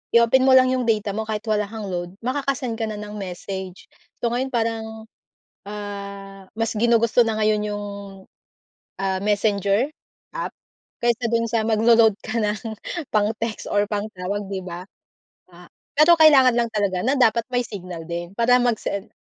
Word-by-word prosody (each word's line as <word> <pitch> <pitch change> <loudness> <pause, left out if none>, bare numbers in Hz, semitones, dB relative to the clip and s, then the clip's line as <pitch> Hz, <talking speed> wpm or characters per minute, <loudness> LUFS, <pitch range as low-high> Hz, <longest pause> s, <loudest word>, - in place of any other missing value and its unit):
i-open 245 +3 +5
mo 260 - +7
lang 255 0 +6
iyong 255 -2 0
data 210 -2 +1
mo 220 +2 -4
kahit 215 -1 -3
wala 210 -2 0
kang 215 -2 -6
load, 175 +1 -4
makaka-send 255 -3 -2
ka 225 - -1
na 215 - -4
ng 210 0 -7
message, 190 0 -6 0.4
so 235 - +1
ngayon 255 +2 0
parang, 225 -2 -1 0.8
ah, 200 -1 -7
mas 225 0 -1
ginugusto 230 +1 +3
na 220 -1 -1
ngayon 215 -1 +2
yung, 205 0 -4 1.2
ah, 190 -1 -1
Messenger 205 +3 +1 0.4
app - - -4 0.5
kaysa 235 0 +1
dun 230 0 +2
sa 230 -1 +1
maglo-load 225 -1 +5
ka 225 +1 -3
ng 210 -1 -1 0.5
pang-text 215 +1 -1
or 205 0 +2
pang-tawag 205 -2 -3
'di 195 -1 -3
ba? 175 0 -6 0.7
A 175 0 -15 0.3
pero 320 +3 +7
kailangan 270 -6 +7
lang 235 -1 +1
talaga 200 -3 0
na 265 - +3
dapat 230 -2 +3
may 245 - +2
signal 180 -5 -8
din 175 +2 -5
para 245 +1 +4
mag-send, 220 -4 -2
215 Hz, 155 wpm, -22 LUFS, 200-235 Hz, 1.2 s, mo